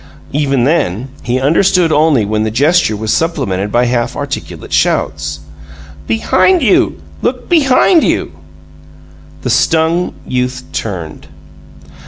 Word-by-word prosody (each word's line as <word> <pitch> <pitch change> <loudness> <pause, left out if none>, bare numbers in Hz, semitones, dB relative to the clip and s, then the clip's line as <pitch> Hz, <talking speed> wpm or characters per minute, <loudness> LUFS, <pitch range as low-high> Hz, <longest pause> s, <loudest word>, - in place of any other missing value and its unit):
Even 140 -3 +1
then 130 - 0
he 125 +2 -1
understood 165 +4 +2
only 150 -7 +3
when 105 +1 -1
the 110 - 0
gesture 140 -1 +2
was 110 0 -1
supplemented 110 - -1
by 120 +2 +2
half 120 -1 -1
articulate - - -6
shouts: 75 0 0 0.7
"Behind 305 - +2
you! 210 - +2 0.2
Look - - -2
BEHIND 320 +1 +4
you!" - - 0 1.1
The - - -1
stung 165 +2 +1
youth 125 0 -2
turned. 90 -7 -5
130 Hz, 115 wpm, -14 LUFS, 110-165 Hz, 1.1 s, BEHIND